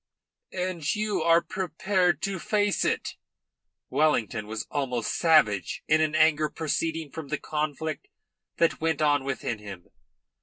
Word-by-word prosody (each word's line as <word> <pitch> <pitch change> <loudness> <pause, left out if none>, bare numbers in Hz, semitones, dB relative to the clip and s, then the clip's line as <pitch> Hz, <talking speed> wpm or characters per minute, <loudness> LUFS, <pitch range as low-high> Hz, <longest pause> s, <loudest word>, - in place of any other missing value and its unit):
"And 180 -3 -1
you 210 -4 -1
are 165 +1 +4
prepared 185 -1 0
to 195 -2 -2
face 205 +2 +1
it?" - - -1 0.7
Wellington 115 -8 +1
was 110 +2 -4
almost 125 -5 -1
savage 115 - +3
in 155 0 +4
an 155 0 +1
anger 155 -1 +4
proceeding 160 -1 -2
from 160 -3 -7
the - - -2
conflict 155 0 -3 0.5
that 165 -1 +2
went 160 -1 +1
on 145 -2 +3
within 130 -4 -3
him. 100 -4 -10
155 Hz, 130 wpm, -27 LUFS, 140-170 Hz, 0.7 s, are